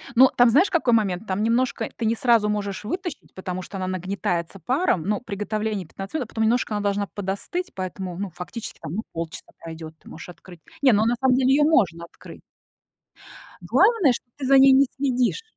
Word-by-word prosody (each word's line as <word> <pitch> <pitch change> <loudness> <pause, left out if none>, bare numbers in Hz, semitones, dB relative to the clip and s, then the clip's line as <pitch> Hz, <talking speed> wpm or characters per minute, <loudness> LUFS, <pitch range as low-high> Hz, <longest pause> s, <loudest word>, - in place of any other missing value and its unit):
Ну, 260 +2 +7
там, 245 -1 +6
знаешь, 335 - +4
какой 310 -8 +2
момент? 200 -3 0
Там 190 +1 -1
немножко 235 +3 0
ты - - -4
не 225 - +2
сразу 230 -3 +3
можешь 205 -1 -3
вытащить, 350 - -6
потому 185 -1 -5
что 195 - -9
она 185 -1 -3
нагнетается 185 -1 -3
паром, 255 - +1
но 205 +4 -1
приготовление 210 -2 -3
15 195 - -9
минут, 285 -6 -1
а - - -29
потом 220 -1 -1
немножко 225 -1 +1
она 205 - -2
должна 200 0 0
подостыть, 200 - -4
поэтому, 185 -1 -5
ну, 200 -1 -4
фактически, 180 +7 -8
там, 155 - -6
ну, 220 - -2
полчаса 165 -1 -7
пройдёт, 160 -1 -8
ты - - -18
можешь 160 - -10
открыть. 175 -1 -13 0.2
Не, 265 -3 +6
ну, 215 0 +3
на 235 +2 +2
самом 260 -1 +3
деле 260 0 +3
её 295 +1 +4
можно 185 - +2
открыть. 170 - -13 1.2
Главное, 435 - +3
что - - -6
ты 275 - -4
за 270 +1 +6
ней 270 0 +7
не 275 +1 +5
следишь. 260 - 0
210 Hz, 200 wpm, -23 LUFS, 185-255 Hz, 1.2 s, Ну